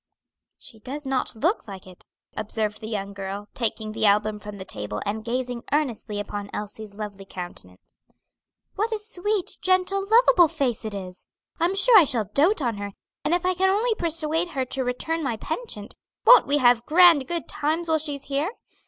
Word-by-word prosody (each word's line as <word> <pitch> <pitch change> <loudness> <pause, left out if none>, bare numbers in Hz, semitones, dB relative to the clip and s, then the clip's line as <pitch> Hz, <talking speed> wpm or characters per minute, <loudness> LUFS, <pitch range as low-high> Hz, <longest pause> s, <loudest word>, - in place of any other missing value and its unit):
"She 220 - -12
does 275 +6 -7
not 265 -2 -1
look 325 - 0
like 195 -2 -9
it," 185 -1 -13 0.3
observed 215 0 -3
the 220 - -6
young 200 -2 -4
girl, 200 +1 -6
taking 220 -2 -2
the 220 0 +1
album 210 +1 +2
from 210 0 -8
the 190 -1 -8
table 105 - -5
and 215 +2 -3
gazing 245 +1 -3
earnestly 240 -8 -1
upon 205 0 -5
Elsie's 210 0 -7
lovely 205 -2 -7
countenance. 175 - -11 0.7
"What 435 +3 -1
a 440 - 0
sweet, 415 -2 -3
gentle, 370 +1 +2
lovable 450 -6 +6
face 270 -8 -2
it 215 -2 -4
is! 185 -2 -8 0.3
I'm 345 +4 +1
sure 435 +2 +7
I 340 - +5
shall 240 -6 +2
dote 315 +3 +3
on 235 -4 -1
her; 200 0 -6 0.3
and 335 - +2
if 355 0 -2
I 370 - +3
can 380 +1 +2
only 440 +4 +2
persuade 330 -2 -1
her 260 - +1
to 260 +1 -2
return 315 +7 -2
my 240 -5 -1
penchant, 310 - -6 0.3
won't - - +8
we 285 +1 +3
have 245 -3 +4
grand 330 -4 +6
good 340 -2 -3
times 315 +3 -1
while 320 -1 +2
she's 290 -3 -5
here? 280 +5 -1
255 Hz, 185 wpm, -24 LUFS, 210-340 Hz, 0.7 s, won't